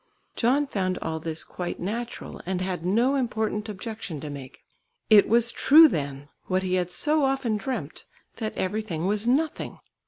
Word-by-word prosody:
John 265 Hz, +5 st, +2 dB
found 185 Hz, -8 st, -2 dB
all 160 Hz, 0 st, -3 dB
this 160 Hz, 0 st, -3 dB
quite 180 Hz, -1 st, -5 dB
natural, 230 Hz, +6 st, -5 dB
and 185 Hz, -1 st, -1 dB
had 185 Hz, -2 st, -3 dB
no 230 Hz, +9 st, +2 dB
important 220 Hz, -5 st, -1 dB
objection 205 Hz, -5 st, -6 dB
to 150 Hz, -, -6 dB
make. 135 Hz, -2 st, -10 dB, 0.5 s
It 210 Hz, -2 st, +7 dB
was 235 Hz, +1 st, +5 dB
true 315 Hz, +3 st, +7 dB
then, 145 Hz, -, -4 dB, 0.2 s
what 185 Hz, 0 st, 0 dB
he 185 Hz, -1 st, -1 dB
had 180 Hz, -1 st, +1 dB
so 300 Hz, +8 st, +2 dB
often 270 Hz, -4 st, +1 dB
dreamt, 205 Hz, -, -5 dB, 0.3 s
that 220 Hz, -2 st, -4 dB
everything 185 Hz, -4 st, -2 dB
was 210 Hz, +3 st, 0 dB
nothing! 295 Hz, +5 st, 0 dB
210 Hz, 160 wpm, -26 LUFS, 180-240 Hz, 0.5 s, It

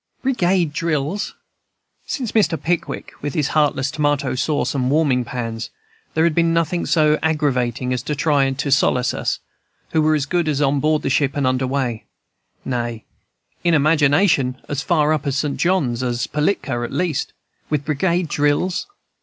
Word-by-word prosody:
"Brigade 185 Hz, -, +1 dB
drills! 165 Hz, +4 st, -2 dB, 0.7 s
Since 250 Hz, -6 st, -3 dB
Mr. 195 Hz, -7 st, +2 dB
Pickwick, 170 Hz, 0 st, -2 dB
with 145 Hz, -1 st, -4 dB
his 150 Hz, -3 st, +1 dB
heartless 145 Hz, -3 st, +1 dB
tomato 145 Hz, -3 st, 0 dB
sauce 145 Hz, +4 st, 0 dB
and 130 Hz, -2 st, 0 dB
warming 140 Hz, -4 st, +2 dB
pans, 115 Hz, -2 st, -5 dB, 0.5 s
there 160 Hz, -, +3 dB
had 170 Hz, -1 st, +3 dB
been 165 Hz, +1 st, +2 dB
nothing 165 Hz, +1 st, 0 dB
so 155 Hz, -2 st, +3 dB
aggravating 130 Hz, -5 st, 0 dB
as 125 Hz, -, -2 dB
to 150 Hz, +4 st, -3 dB
try 145 Hz, -2 st, +2 dB
to 140 Hz, +1 st, -2 dB
solace 125 Hz, -2 st, +2 dB
us, -, -, -1 dB, 0.5 s
who 160 Hz, -, +2 dB
were 155 Hz, 0 st, +3 dB
as 145 Hz, -3 st, 0 dB
good 170 Hz, +2 st, 0 dB
as 145 Hz, -2 st, 0 dB
on 140 Hz, -1 st, +2 dB
board 155 Hz, +2 st, +1 dB
ship 140 Hz, +1 st, +1 dB
and 140 Hz, -, +1 dB
under 130 Hz, 0 st, +1 dB
way, 125 Hz, -4 st, -2 dB, 0.6 s
nay, 120 Hz, -3 st, -3 dB, 0.6 s
in 170 Hz, -1 st, +3 dB
imagination 145 Hz, -2 st, +3 dB
as 145 Hz, -1 st, -2 dB
far 155 Hz, -2 st, +2 dB
up 155 Hz, -, 0 dB
the 140 Hz, -1 st, -2 dB
St. 140 Hz, +1 st, -1 dB
John's 145 Hz, -10 st, +1 dB
as 120 Hz, -1 st, -1 dB
Pilatka 150 Hz, -6 st, -1 dB
at 120 Hz, -, -4 dB
least, 175 Hz, -3 st, -1 dB, 0.4 s
with 150 Hz, -2 st, -1 dB
brigade 170 Hz, +3 st, 0 dB
drills! 150 Hz, +5 st, 0 dB
145 Hz, 160 wpm, -20 LUFS, 130-160 Hz, 0.7 s, there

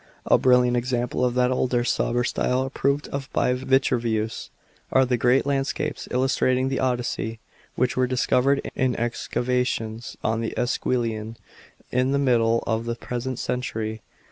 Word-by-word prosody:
A -, -, +4 dB
brilliant 125 Hz, -1 st, +4 dB
example 120 Hz, 0 st, -1 dB
of 125 Hz, -1 st, +1 dB
that 125 Hz, 0 st, +3 dB
older, 125 Hz, -1 st, +1 dB
sober 120 Hz, 0 st, 0 dB
style, 125 Hz, +1 st, 0 dB
approved 140 Hz, +2 st, -1 dB
of 140 Hz, -1 st, -5 dB
by 125 Hz, -, +2 dB
Vitruvius, 125 Hz, -4 st, 0 dB, 0.4 s
are 130 Hz, 0 st, +4 dB
the 125 Hz, 0 st, +1 dB
great 125 Hz, +3 st, +3 dB
landscapes 140 Hz, -1 st, -2 dB
illustrating 130 Hz, 0 st, +1 dB
the 135 Hz, -, -1 dB
Odyssey, 120 Hz, -3 st, -1 dB, 0.4 s
which 125 Hz, 0 st, +1 dB
were 130 Hz, 0 st, +2 dB
discovered 130 Hz, +2 st, +2 dB
in 130 Hz, -2 st, 0 dB
excavations 120 Hz, -1 st, -2 dB
on 115 Hz, +1 st, 0 dB
the 115 Hz, -, -3 dB
Esquiline 115 Hz, -3 st, -1 dB, 0.5 s
in 130 Hz, +2 st, +1 dB
the -, -, +3 dB
middle 115 Hz, -4 st, +2 dB
of 115 Hz, +1 st, -1 dB
the 120 Hz, 0 st, -2 dB
present 125 Hz, +1 st, -4 dB
century. 110 Hz, -4 st, -3 dB
125 Hz, 145 wpm, -24 LUFS, 115-130 Hz, 0.5 s, A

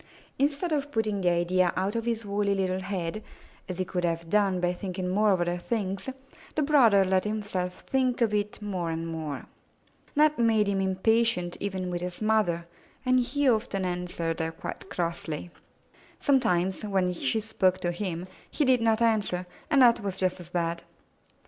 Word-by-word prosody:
Instead 290 Hz, +5 st, +1 dB
of 290 Hz, -1 st, -1 dB
putting 215 Hz, -4 st, 0 dB
the 180 Hz, -, +3 dB
idea 175 Hz, +1 st, +2 dB
out 195 Hz, +3 st, 0 dB
of 230 Hz, 0 st, -1 dB
his 230 Hz, -2 st, -1 dB
woolly 200 Hz, 0 st, 0 dB
little 185 Hz, -1 st, 0 dB
head, 190 Hz, 0 st, -3 dB, 0.5 s
as 180 Hz, -, -4 dB
he 185 Hz, -, -1 dB
could 180 Hz, 0 st, -3 dB
have 165 Hz, -1 st, -2 dB
done 200 Hz, -3 st, +3 dB
by 175 Hz, 0 st, +1 dB
thinking 185 Hz, 0 st, -4 dB
more 210 Hz, +4 st, +3 dB
of 190 Hz, -, +2 dB
other 175 Hz, 0 st, 0 dB
things, 195 Hz, +2 st, -2 dB, 0.5 s
the 305 Hz, -, +2 dB
brother 235 Hz, -10 st, +5 dB
let 185 Hz, 0 st, +2 dB
himself 205 Hz, -4 st, -3 dB
think 255 Hz, -2 st, 0 dB
of 225 Hz, -3 st, +2 dB
it 210 Hz, 0 st, -1 dB
more 185 Hz, -5 st, -2 dB
and 165 Hz, 0 st, -3 dB
more. 160 Hz, -3 st, -5 dB, 0.7 s
That 305 Hz, -1 st, +4 dB
made 225 Hz, -2 st, +4 dB
him 195 Hz, -1 st, +1 dB
impatient 190 Hz, -1 st, +1 dB
with -, -, -12 dB
even 185 Hz, -3 st, -3 dB
his 180 Hz, 0 st, -5 dB
mother, 215 Hz, -6 st, +1 dB, 0.4 s
and 255 Hz, 0 st, +4 dB
he 270 Hz, +3 st, +1 dB
often 215 Hz, -5 st, +1 dB
answered 175 Hz, -2 st, -2 dB
her 160 Hz, 0 st, -1 dB
quite 190 Hz, -, -8 dB
crossly. 170 Hz, -2 st, -3 dB, 0.7 s
Some 275 Hz, -2 st, +4 dB
times, 190 Hz, -5 st, 0 dB
when 190 Hz, -3 st, +1 dB
she 175 Hz, +5 st, 0 dB
spoke 195 Hz, -4 st, +1 dB
to 175 Hz, -, 0 dB
him, 175 Hz, -1 st, -3 dB, 0.2 s
he 295 Hz, -, 0 dB
did 255 Hz, -2 st, +4 dB
not 225 Hz, 0 st, +3 dB
answer, 205 Hz, -5 st, +1 dB, 0.2 s
and 280 Hz, -4 st, +5 dB
that 235 Hz, -1 st, +6 dB
was 195 Hz, -2 st, -3 dB
just 185 Hz, -1 st, 0 dB
as 175 Hz, -2 st, -10 dB
bad. 170 Hz, -1 st, -1 dB
195 Hz, 180 wpm, -28 LUFS, 180-225 Hz, 0.7 s, that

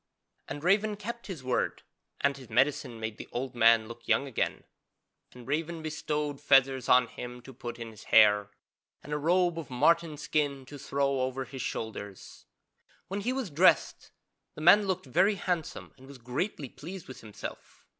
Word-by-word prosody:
And 145 Hz, +2 st, -6 dB
Raven 205 Hz, +4 st, +3 dB
kept 235 Hz, +4 st, -7 dB
his 175 Hz, -10 st, -7 dB
word 125 Hz, -1 st, -1 dB, 0.4 s
and 140 Hz, 0 st, +2 dB
his 130 Hz, -5 st, -12 dB
medicine 125 Hz, -1 st, +1 dB
made 110 Hz, -1 st, -4 dB
the -, -, -9 dB
old 130 Hz, +1 st, -4 dB
man 115 Hz, -2 st, +5 dB
look 115 Hz, 0 st, -11 dB
young -, -, +3 dB
again, 135 Hz, -5 st, -2 dB, 0.7 s
and 125 Hz, -1 st, -13 dB
Raven 160 Hz, +3 st, -2 dB
bestowed 150 Hz, -2 st, -3 dB
feathers 135 Hz, -3 st, +3 dB
on 125 Hz, 0 st, +6 dB
him 125 Hz, +1 st, -8 dB
to 135 Hz, -, -11 dB
put 120 Hz, -1 st, -7 dB
in 115 Hz, -1 st, -7 dB
his 110 Hz, -1 st, -14 dB
hair, 105 Hz, -2 st, +5 dB, 0.5 s
and 150 Hz, -, -6 dB
a 150 Hz, -, -1 dB
robe 175 Hz, +2 st, +2 dB
of 160 Hz, -, -8 dB
marten 165 Hz, +5 st, +2 dB
skin 145 Hz, -2 st, -1 dB
to 145 Hz, +2 st, -10 dB
throw 140 Hz, 0 st, 0 dB
over 130 Hz, +1 st, -2 dB
his 130 Hz, +1 st, -7 dB
shoulders. 100 Hz, -4 st, -6 dB, 0.6 s
When 200 Hz, +2 st, -3 dB
he 240 Hz, +5 st, -1 dB
was 260 Hz, -9 st, -3 dB
dressed 170 Hz, +6 st, +3 dB, 0.5 s
the -, -, -8 dB
man 200 Hz, +5 st, +6 dB
looked 185 Hz, -3 st, -1 dB
very 195 Hz, -, +3 dB
handsome 180 Hz, -5 st, -3 dB
and 130 Hz, -, -14 dB
was 140 Hz, -1 st, -11 dB
greatly 135 Hz, -, -3 dB
pleased 175 Hz, +8 st, -9 dB
with 130 Hz, -, -10 dB
himself. 110 Hz, -2 st, -10 dB
140 Hz, 175 wpm, -29 LUFS, 125-170 Hz, 0.7 s, on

